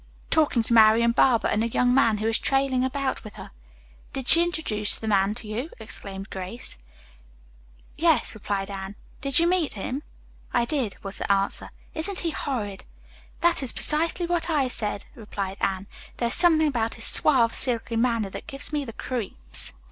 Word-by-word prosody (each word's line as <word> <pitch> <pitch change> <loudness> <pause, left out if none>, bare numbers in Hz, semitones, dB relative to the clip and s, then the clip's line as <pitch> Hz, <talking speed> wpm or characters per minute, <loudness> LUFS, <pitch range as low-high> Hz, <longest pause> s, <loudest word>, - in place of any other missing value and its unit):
"Talking 295 -7 +3
to 235 - -1
Marian 225 +1 +6
Barber 235 -1 +3
and 215 - +1
a - - +1
young 245 +2 +2
man 230 -5 +3
who 215 +1 -2
is 225 - +1
trailing 270 -2 +1
about 265 +1 -2
with 215 - -11
her." - - -10 0.6
"Did 265 -1 -5
she 335 - +7
introduce 295 -12 0
that 220 - -6
man 200 0 +2
to 225 - -7
you?" 235 +9 -4
exclaimed 195 -3 -6
Grace. 190 - -6 1.2
"Yes," - - +3
replied 200 -2 -3
Anne. 195 0 -6 0.3
"Did 275 -1 0
you 335 - +4
meet 350 -7 +1
him?" 255 +8 -4 0.5
"I 240 -1 +3
did," 250 -7 -2
was 195 0 -2
the - - -1
answer. 195 0 0 0.2
"Isn't 365 +5 -1
he 335 - -1
horrid?" 210 -11 -4 0.6
"That 345 -2 +3
is 260 -4 -1
precisely 330 +3 +1
what 345 -1 -1
I 290 -5 +2
said," 210 -4 -4
replied 205 -6 -6
Anne. 190 0 -1 0.3
"There 235 - 0
is - - +4
something 325 -3 +5
about 235 -6 -1
his 225 - -2
suave, 240 -6 +4
silky 235 -2 -1
manner 230 -4 0
that - - -8
gives 275 +3 -5
me 295 -1 0
the 230 -4 -8
creeps." 200 - 0
235 Hz, 180 wpm, -25 LUFS, 210-280 Hz, 1.2 s, she